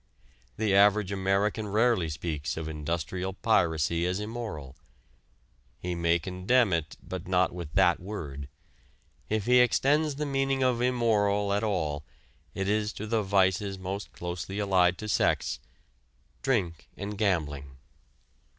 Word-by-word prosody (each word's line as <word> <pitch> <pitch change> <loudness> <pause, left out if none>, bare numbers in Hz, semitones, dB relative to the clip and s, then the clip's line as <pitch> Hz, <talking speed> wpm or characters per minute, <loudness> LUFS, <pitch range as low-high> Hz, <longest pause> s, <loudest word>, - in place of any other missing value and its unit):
The 110 -2 +1
average 100 0 +4
American 100 +2 0
rarely 110 -4 +2
speaks 75 -1 -3
of 80 -1 -4
industrial 85 +4 -3
piracy 85 -5 +1
as 90 +2 -1
immoral. 105 - -6 1.0
He 90 0 -4
may 85 0 +2
condemn 95 +5 +1
it, 85 -2 -2
but 85 - -6
not 90 -1 +2
with 85 -4 -7
that - - +4
word. 75 -8 -6 0.8
If 110 -1 0
he 125 0 +5
extends 145 +4 +3
the 150 +2 -2
meaning 135 -1 0
of 125 -2 +2
immoral 105 -5 +2
at 100 +2 0
all, 80 -8 -1 0.5
it 95 0 -2
is 105 0 0
to 105 - -6
the 110 0 +1
vices 95 0 +1
most 95 +2 -5
closely 90 +2 -5
allied 95 -3 +3
to 110 - -6
sex - - +1 0.8
drink 95 - -1
and 100 +1 -5
gambling. 75 -9 -1
95 Hz, 130 wpm, -28 LUFS, 85-110 Hz, 1.0 s, he